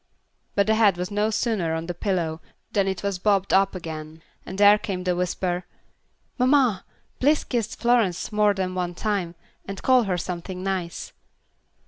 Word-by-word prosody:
But 200 - +3
the 220 - +3
head 210 -5 +4
was 180 +2 -4
no 210 +1 +1
sooner 210 -7 0
on 160 0 -3
the 175 - -4
pillow 170 -4 -2 0.3
than 200 -1 +1
it 190 -1 -3
was 200 -2 -2
bobbed 195 -1 +1
up 195 0 +3
again, 160 -2 -7 0.2
and 190 - -6
there 205 +1 +7
came 185 -3 -4
the 180 -1 0
whisper, 180 0 -1 0.8
"Mamma, 250 -6 +3 0.3
please 295 +4 +3
kiss 235 -3 -2
Florence 230 -7 +1
more 210 -1 +3
than 185 -1 -2
one 180 -1 -3
time, 190 -4 -2 0.3
and 195 -1 -7
call 255 -3 +4
her 185 -2 0
something 180 +1 -5
nice." 185 -3 -3
190 Hz, 165 wpm, -24 LUFS, 180-210 Hz, 0.8 s, there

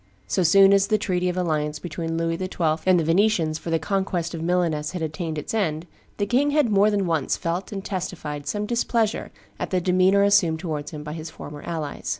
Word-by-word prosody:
So 190 - 0
soon 195 +3 +6
as 200 0 +4
the 215 0 +2
treaty 180 -3 0
of 180 - -3
alliance 155 -4 -1
between 165 0 -4
Louis 165 0 0
XII. 165 -3 -1
and 185 -2 +5
the - - +1
Venetians 165 -2 +2
for - - -7
the 165 - +2
conquest 180 0 -2
of 165 - -5
Milaness 165 -3 0
had 180 -3 -3
attained 160 0 -4
its 150 - -5
end, 165 -7 -1 0.3
the 205 - 0
king 255 +7 +2
had 290 -6 +2
more 205 +1 +5
than 205 -2 0
once 160 -5 0
felt 170 +3 -3
and 195 -1 -5
testified 155 -7 -5
some 205 +6 -2
displeasure 230 -1 0 0.3
at - - -3
the 185 - +1
demeanor 185 +2 +3
assumed 200 -5 +4
towards 155 -4 -4
him 150 -1 -7
by 150 0 -6
his 160 0 -6
former 145 -1 -9
allies. 155 -3 -5
175 Hz, 210 wpm, -24 LUFS, 160-195 Hz, 0.3 s, soon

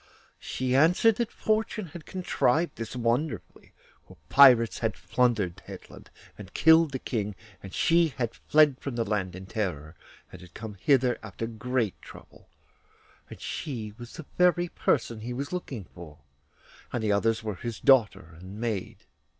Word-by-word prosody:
She 130 0 -2
answered 180 +9 +4
that 235 -1 -2
fortune 215 -1 -1
had 160 +1 -11
contrived 170 -3 0
this 115 +1 -6
wonderfully, 125 +6 -2 0.4
for 95 - -16
pirates 125 -4 +6
had 110 -2 -1
plundered 115 -8 0
Hetland - - -11 0.3
and 100 -2 -11
killed 160 -1 +5
the 135 - -2
King, 105 -5 -3 0.3
and 95 - -10
she 170 - +3
had 125 -6 -4
fled 150 -3 +3
from 140 -4 -5
the 115 -1 -1
land 100 -4 -2
in 95 +1 -9
terror, 90 -7 -4 0.4
and - - -11
had 90 -1 -15
come 110 -1 -7
hither 125 +4 +2
after 115 - -6
great 115 -1 -2
trouble, - - -15 0.8
and - - -11
she 110 -8 -5
was 120 0 -10
the 160 - -9
very 175 -1 +3
person 115 -8 0
he 120 +3 -5
was 140 +6 -5
looking 135 - -5
for, 85 -5 -13 0.7
and 120 - -2
the 105 - +1
others 115 +2 +1
were 110 -1 -3
her 120 +6 -5
daughter 100 - +3
and 95 +4 -10
maid. 110 -5 -4
120 Hz, 160 wpm, -27 LUFS, 105-145 Hz, 0.8 s, pirates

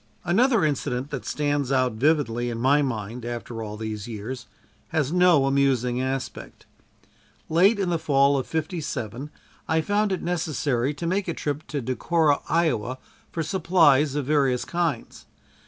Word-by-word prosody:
Another 225 +2 +3
incident 135 -2 -2
that 135 -4 -5
stands 145 -2 -1
out 130 -2 +2
vividly 120 -2 +1
in 115 - -4
my 140 +4 +4
mind 115 -3 -3
after 120 -1 -5
all 105 -1 -6
these 110 -1 -5
years, 120 +3 -6 0.4
has 155 -1 -1
no 180 -6 +5
amusing 130 -3 +1
aspect. 130 0 -5 0.8
Late 190 +7 +4
in 190 -3 -1
the 170 - 0
fall 140 -2 +3
of 130 -2 -1
'57 150 - -4 0.4
I 160 0 +2
found 205 +4 0
it 190 - -2
necessary 150 -6 -1
to 170 - -5
make 185 +3 0
a 170 - -2
trip 145 +1 -4
to 140 -1 -3
Decorah, 145 +5 +1
Iowa, 130 -7 +1 0.3
for 165 - -2
supplies 155 -5 +3
of 145 -2 -1
various 135 -4 +1
kinds. 170 -3 -3
140 Hz, 150 wpm, -25 LUFS, 125-160 Hz, 0.8 s, no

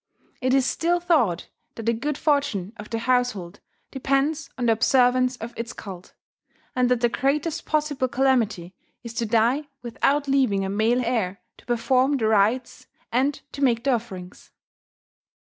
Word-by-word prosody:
It 255 +1 +2
is 270 -2 +3
still 345 +5 +1
thought 280 - +1 0.3
that 225 - -7
the 230 - +2
good 280 +5 -3
fortune 280 - 0
of 210 -1 -10
the 230 - -2
household 230 -7 -1 0.3
depends 275 +3 0
on 245 - -1
the 230 - +4
observance 250 +2 +3
of 235 +1 -7
its 230 0 -5
cult, 185 -3 -10 0.6
and 250 -1 +2
that 250 -2 +2
the 240 - +4
greatest 295 +7 -1
possible 295 -4 0
calamity 235 -9 +1 0.3
is 235 -1 -7
to 230 0 -2
die 235 +7 +2 0.2
without 280 +4 0
leaving 255 -8 +2
a - - -3
male 225 +5 +1
heir 210 -6 -1 0.2
to - - -21
perform 255 +3 +2
the 225 - -1
rites 220 +4 +1 0.2
and 270 +4 +1
to 280 - -7
make 235 -3 +2
the 275 - +2
offerings. 190 -6 -6
245 Hz, 160 wpm, -24 LUFS, 225-275 Hz, 0.6 s, the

